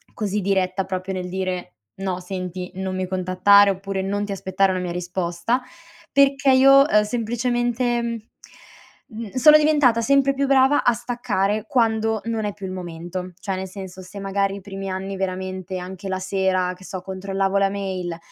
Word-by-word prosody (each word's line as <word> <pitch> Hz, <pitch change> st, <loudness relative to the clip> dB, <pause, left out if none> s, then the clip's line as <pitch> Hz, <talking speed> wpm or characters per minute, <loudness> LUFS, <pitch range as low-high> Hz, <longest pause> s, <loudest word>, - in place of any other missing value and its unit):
così 210 Hz, -2 st, -1 dB
diretta 190 Hz, 0 st, 0 dB
proprio 185 Hz, 0 st, -4 dB
nel 180 Hz, -1 st, -4 dB
dire: 185 Hz, -1 st, -3 dB, 0.2 s
"No 190 Hz, -2 st, -3 dB
senti 180 Hz, -1 st, -5 dB
non 190 Hz, 0 st, -3 dB
mi 185 Hz, 0 st, -1 dB
contattare." 190 Hz, +2 st, +4 dB
Oppure 195 Hz, 0 st, -4 dB
"Non 200 Hz, +2 st, -2 dB
ti 200 Hz, -, -6 dB
aspettare 190 Hz, 0 st, +1 dB
una 185 Hz, -, -1 dB
mia 175 Hz, -1 st, -3 dB
risposta." 180 Hz, +6 st, -2 dB, 0.5 s
Perché 275 Hz, 0 st, +4 dB
io, 275 Hz, +2 st, +7 dB
ehm, 210 Hz, -5 st, +4 dB
semplicemente, 240 Hz, +2 st, 0 dB, 1.1 s
mhmm, 220 Hz, -3 st, -8 dB
sono 300 Hz, +4 st, +7 dB
diventata 295 Hz, -6 st, +3 dB
sempre 275 Hz, +2 st, +3 dB
più 275 Hz, 0 st, 0 dB
brava 270 Hz, +1 st, +4 dB
a 240 Hz, -, +5 dB
staccare 215 Hz, -3 st, -1 dB
quando 225 Hz, -3 st, +1 dB
non 225 Hz, -2 st, -2 dB
è 205 Hz, -, -2 dB
più 200 Hz, -2 st, -8 dB
il 185 Hz, -, -5 dB
momento, 180 Hz, 0 st, -6 dB
cioè 195 Hz, -1 st, -2 dB
nel 190 Hz, 0 st, -4 dB
senso 190 Hz, -1 st, -9 dB
se 190 Hz, +2 st, -10 dB
magari 195 Hz, 0 st, 0 dB
i 200 Hz, -, -8 dB
primi 195 Hz, 0 st, -6 dB
anni 190 Hz, +1 st, -4 dB
veramente 185 Hz, 0 st, -4 dB
anche 190 Hz, +2 st, -7 dB
la 190 Hz, 0 st, -2 dB
sera, 185 Hz, -1 st, 0 dB
che 185 Hz, -, -14 dB
so, 185 Hz, +1 st, -6 dB
controllavo 195 Hz, +1 st, -2 dB
la 195 Hz, 0 st, +3 dB
mail, 185 Hz, -4 st, -4 dB
195 Hz, 170 wpm, -22 LUFS, 185-225 Hz, 1.1 s, io